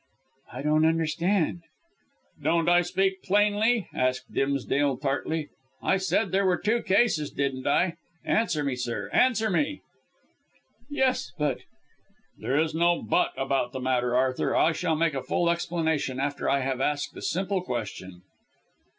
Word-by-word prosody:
"I 130 +2 -6
don't 155 +1 +3
understand 165 +2 0 0.4
" - - -34
"Don't 165 0 +2
I 175 0 +5
speak 190 +2 0
plainly?" 210 +2 +2
asked 130 0 -1
Dimsdale 140 0 0
tartly. 150 +3 -2 0.3
"I 190 - +2
said 190 0 0
there 195 0 +2
were 180 -1 +2
two 225 +3 0
cases, 190 -7 +2
didn't 135 -1 -2
I? 170 +4 +2 0.3
Answer 180 -9 +1
me, 140 -3 -1
sir; 125 -1 -4
answer 225 -4 +3
me?" 290 +10 0 1.1
"Yes, 265 - 0
but 145 -4 0 0.4
" - - -39
"There 135 - 0
is 160 0 0
no 170 +1 +2
but 110 - +1
about 135 -2 -1
the 130 - -4
matter, 125 -1 0
Arthur. 130 0 +1
I 165 - +4
shall 160 0 -1
make 165 0 +1
a 135 - -2
full 170 +5 +1
explanation 160 -6 -1
after 140 +1 -1
I 140 0 +2
have 130 0 -2
asked 145 +1 -1
a - - -8
simple 190 +2 -1
question." 100 - -6
160 Hz, 150 wpm, -26 LUFS, 135-185 Hz, 1.1 s, I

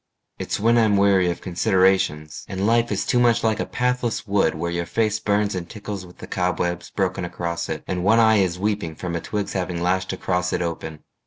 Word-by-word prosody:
It's - - -2
when 115 +3 +4
I'm 110 -3 +3
weary 100 -2 +4
of 85 - -4
considerations, 90 -5 +1
And 95 0 -2
life 115 +1 +2
is 100 - -1
too 125 - +2
much 120 -1 +3
like 110 -1 +1
a - - -2
pathless 125 -2 -1
wood 100 -5 +1
Where 85 +2 -3
your 85 0 -2
face 110 -1 0
burns 105 -1 +1
and 90 -2 -5
tickles 100 -3 -7
with 90 - -17
the - - -9
cobwebs 90 -1 -2
Broken 95 -2 -1
across 85 -1 -4
it, 80 - -4
and 90 -1 -2
one 110 +4 +4
eye 110 -1 +5
is 90 -3 +1
weeping 100 -5 -2
From 85 0 -4
a 85 - -2
twig's 105 -2 -3
having 90 -2 -2
lashed 95 +2 0
across 90 -1 -1
it - - 0
open. 80 -2 -5
95 Hz, 215 wpm, -23 LUFS, 85-105 Hz, -, eye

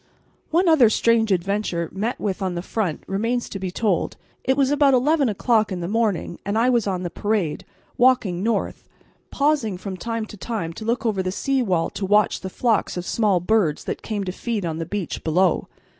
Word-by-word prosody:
One 350 +3 +2
other 295 -9 +6
strange 225 -1 +2
adventure 185 -2 0
met 220 +5 -2
with 200 -1 -2
on 185 -2 -1
the 175 - -3
front 195 -7 -2
remains 230 +5 -1
to 195 - -6
be 190 -1 -3
told. 195 -1 -1 0.3
It 265 +1 +1
was 275 -1 +3
about 285 -2 +4
eleven 280 +1 +3
o'clock 220 +1 +1
in 185 - -3
the 170 - -3
morning 210 -5 -1
and 200 +2 -1
I 245 +3 +3
was 235 -4 +1
on 185 -2 -1
the 175 - -4
parade, 205 -6 -1 0.4
walking 235 -8 +3
north, 225 +3 -2 0.4
pausing 280 -9 +1
from 190 0 -6
time 230 +1 -3
to 210 - -11
time 190 -6 -4
to 215 - -8
look 235 +2 -1
over 210 -4 +1
the 185 0 -2
sea 270 +7 0
wall 180 -8 0
to - - -6
watch 210 +2 +3
the 190 - -5
flocks 225 -1 0
of 175 - -4
small 205 -4 +2
birds 180 -4 +1
that - - -4
came 210 -3 -3
to 185 - -3
feed 215 0 -3
on 160 -1 -3
the 165 - -4
beach 200 -4 -4
below. 175 +2 +2
210 Hz, 205 wpm, -23 LUFS, 185-235 Hz, 0.4 s, other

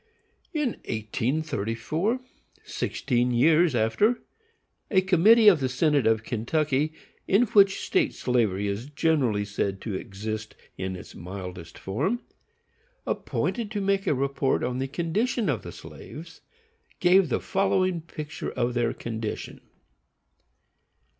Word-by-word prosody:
In 300 -6 0 0.2
1834, 130 - -1 0.4
sixteen 125 -2 -1
years 155 +5 +4
after, 120 - +2 0.7
a 190 - +4
committee 200 +5 +5
of 185 -7 +8
the 130 -2 0
Synod 145 +1 +2
of 110 -1 +2
Kentucky, 145 +6 0 0.3
in 200 +5 +5
which 200 -4 +4
state 350 -6 +1
slavery 110 -6 +1
is 100 +6 -3
generally 140 -9 +1
said 100 -1 -2
to 110 - -4
exist 110 +3 -5 0.2
in 95 0 -4
its 90 - -10
mildest 90 -2 -8
form, 190 - -1 0.8
appointed 230 -4 -2
to 210 -2 -3
make 195 0 0
a - - +3
report 135 0 0
on 125 +1 -1
the 135 - -1
condition 200 - -1
of 120 -7 0
the - - -8
slaves, 165 +2 -11 0.6
gave 180 -1 +5
the - - +1
following 185 -2 +1
picture 155 -1 -6
of 125 -1 -1
their 120 -1 +1
condition. 110 -2 -5
140 Hz, 120 wpm, -26 LUFS, 110-185 Hz, 0.8 s, of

